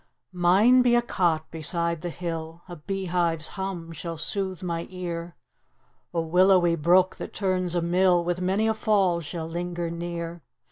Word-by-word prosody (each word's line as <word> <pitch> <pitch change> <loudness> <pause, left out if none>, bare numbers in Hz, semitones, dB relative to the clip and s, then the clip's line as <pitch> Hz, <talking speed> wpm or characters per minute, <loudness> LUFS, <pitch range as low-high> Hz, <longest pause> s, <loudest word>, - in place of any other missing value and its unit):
Mine 195 +8 +5
be 245 -1 +4
a 240 - +4
cot 165 -8 0
beside 170 +1 0
the 175 - -4
hill, 165 -1 -6
A 175 - -8
bee 195 +5 -4
hive's 170 -3 0
hum 190 -4 -5
shall 165 +1 -6
sooth 190 +2 -3
my 170 -2 -3
ear; 175 -2 -6 0.8
A 170 - -1
willowy 175 +1 +4
brook, 180 +4 +3
that - - -8
turns 185 -3 0
a 175 - +1
mill, 175 0 +3
With 175 +1 -2
many 190 +4 +1
a 220 - +2
fall 200 -6 +2
shall 160 +1 -5
linger 175 0 -4
near. 170 0 -5
175 Hz, 160 wpm, -26 LUFS, 170-185 Hz, 0.8 s, Mine